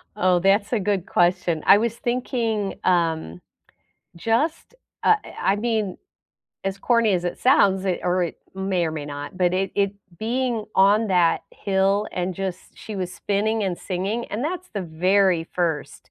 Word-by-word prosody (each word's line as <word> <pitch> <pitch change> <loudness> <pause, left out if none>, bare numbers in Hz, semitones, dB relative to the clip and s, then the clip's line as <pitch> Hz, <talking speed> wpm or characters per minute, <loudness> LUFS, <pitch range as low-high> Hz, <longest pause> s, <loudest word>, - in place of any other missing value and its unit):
Oh, 185 -3 +3
that's 200 +5 +2
a 225 - +2
good 195 -2 -1
question. 175 -2 +1
I - - +8
was 230 0 -1
thinking, 235 -4 -1
um, 165 - 0 0.8
just 235 - -1 0.3
uh, 440 - +5
I 195 - -1
I - - 0
mean, 215 -3 -1 0.7
as 195 0 -2
corny 230 -1 +2
as 180 -2 0
it 175 - -3
sounds, 195 -7 +4
it 185 -2 -1
or 180 0 +1
it 170 - -6 0.2
may 190 -2 0
or - - -2
may 155 -2 -5
not, 145 +3 -7
but 180 -1 +2
it 190 +1 0
it 200 -1 +1 0.3
being 235 0 -1
on 205 +3 +4
that 175 -3 +3
hill, 195 +1 +1
and 180 0 -2
just 190 -1 -3 0.2
she 215 - -8
was 185 -1 -3
spinning 215 +3 -1
and 185 -2 -1
singing, 195 +6 -3
and 215 +4 -3
that's 360 +4 -3
the 205 - -3
very 180 +1 +2
first, 165 -5 -3
195 Hz, 170 wpm, -23 LUFS, 180-220 Hz, 0.8 s, I